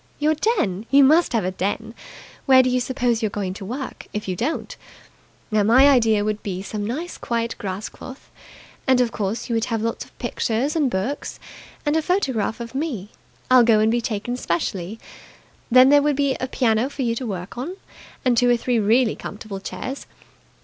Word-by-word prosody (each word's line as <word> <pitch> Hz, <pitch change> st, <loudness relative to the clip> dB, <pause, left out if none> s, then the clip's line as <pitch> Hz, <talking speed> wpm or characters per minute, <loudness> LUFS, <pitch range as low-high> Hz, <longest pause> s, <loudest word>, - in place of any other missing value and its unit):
"Your 305 Hz, +1 st, +2 dB, 0.2 s
den. 205 Hz, -, -1 dB
You 280 Hz, 0 st, +6 dB
must 315 Hz, +5 st, +5 dB
have 225 Hz, -6 st, +1 dB
a 185 Hz, -, -1 dB
den. 205 Hz, +4 st, -3 dB, 0.5 s
Where 260 Hz, -1 st, +7 dB
do 255 Hz, -, +1 dB
you 250 Hz, -, +2 dB
suppose 245 Hz, -2 st, 0 dB
you're 215 Hz, -, 0 dB
going 200 Hz, -2 st, -3 dB
to 200 Hz, -, -9 dB
work, 255 Hz, +6 st, -6 dB
if 210 Hz, -1 st, -4 dB
you 185 Hz, -, -1 dB
don't? 310 Hz, -, -3 dB, 0.8 s
Now, 215 Hz, -1 st, +3 dB
my 240 Hz, +7 st, +6 dB
idea 225 Hz, -6 st, +4 dB
would 215 Hz, 0 st, -2 dB
be 190 Hz, -2 st, -4 dB
some 205 Hz, +1 st, -4 dB
nice 295 Hz, +12 st, -4 dB
quiet 230 Hz, -1 st, -2 dB
grass 195 Hz, +1 st, -4 dB
cloth. 260 Hz, 0 st, -12 dB, 0.6 s
And, 260 Hz, -1 st, +4 dB
of 245 Hz, -2 st, +2 dB
course, 205 Hz, +2 st, -3 dB
you 240 Hz, -, -2 dB
would 225 Hz, 0 st, +1 dB
have 225 Hz, -3 st, -2 dB
lots 230 Hz, 0 st, -2 dB
of -, -, -21 dB
pictures 240 Hz, +3 st, -1 dB
and 295 Hz, -5 st, +2 dB
books. 225 Hz, +8 st, -3 dB, 0.5 s
And 295 Hz, +1 st, +1 dB
a 320 Hz, -, +3 dB
photograph 265 Hz, -, 0 dB
of 235 Hz, 0 st, -7 dB
me. 265 Hz, -, -3 dB, 0.4 s
I'll 255 Hz, -1 st, +8 dB
go 225 Hz, -2 st, +5 dB
and 220 Hz, +1 st, +3 dB
be 240 Hz, +1 st, +1 dB
taken 230 Hz, +2 st, -3 dB
specially. 180 Hz, +1 st, -3 dB, 0.7 s
Then 255 Hz, +2 st, +7 dB
there 290 Hz, 0 st, +6 dB
would 295 Hz, 0 st, +1 dB
be 280 Hz, -1 st, +1 dB
a 255 Hz, -, -2 dB
piano 240 Hz, -1 st, +1 dB
for 280 Hz, -1 st, -4 dB
you 230 Hz, -1 st, +1 dB
to 240 Hz, +1 st, -4 dB
work 185 Hz, -3 st, -5 dB
on, 280 Hz, +10 st, -5 dB, 0.5 s
and 250 Hz, -1 st, +4 dB
two 245 Hz, +1 st, +3 dB
or 240 Hz, -, +4 dB
three 240 Hz, 0 st, 0 dB
really 220 Hz, +3 st, +3 dB
comfortable 205 Hz, -2 st, -7 dB
chairs. 200 Hz, +9 st, -6 dB
235 Hz, 200 wpm, -22 LUFS, 210-260 Hz, 0.8 s, I'll